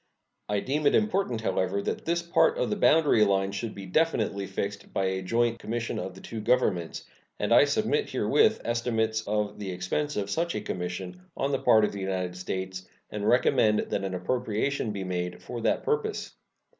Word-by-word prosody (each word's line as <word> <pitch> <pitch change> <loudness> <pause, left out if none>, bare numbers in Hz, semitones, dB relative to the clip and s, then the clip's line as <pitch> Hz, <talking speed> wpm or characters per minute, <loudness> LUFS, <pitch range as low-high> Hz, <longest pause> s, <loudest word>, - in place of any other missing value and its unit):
I 105 -1 +1
deem 145 +5 0
it - - +4
important, 195 - +1
however, 95 -1 0
that - - -3
this 170 +1 0
part 170 - +3
of - - 0
the - - +1
boundary 155 - +4
line 95 -1 +2
should 105 +3 -4
be 100 - -7
definitely 105 - 0
fixed 100 0 -4
by 95 - 0
a 95 0 -1
joint 115 +4 +1
commission 115 +1 -3
of 95 -1 -5
the 95 - -12
two 115 -1 -6
Governments, 105 -8 0 0.3
and - - +1
I - - +7
submit - - 0
herewith - - +3
estimates 115 -2 0
of 105 0 -1
the 100 -2 -4
expense 90 +12 -2
of 100 -1 -2
such 170 +5 -1
a - - -2
commission 90 - -5 0.2
on 140 - 0
the 135 - +1
part 110 -1 +5
of - - -2
the 100 - -6
United 95 -2 -2
States 95 0 -5 0.2
and 105 0 -3
recommend 120 -3 +3
that 100 - -1
an 95 -1 -3
appropriation 115 +4 -1
be 100 -2 -4
made 90 -1 -4
for 120 -1 -6
that - - +1
purpose. 440 -1 -1
105 Hz, 190 wpm, -27 LUFS, 95-125 Hz, 0.3 s, I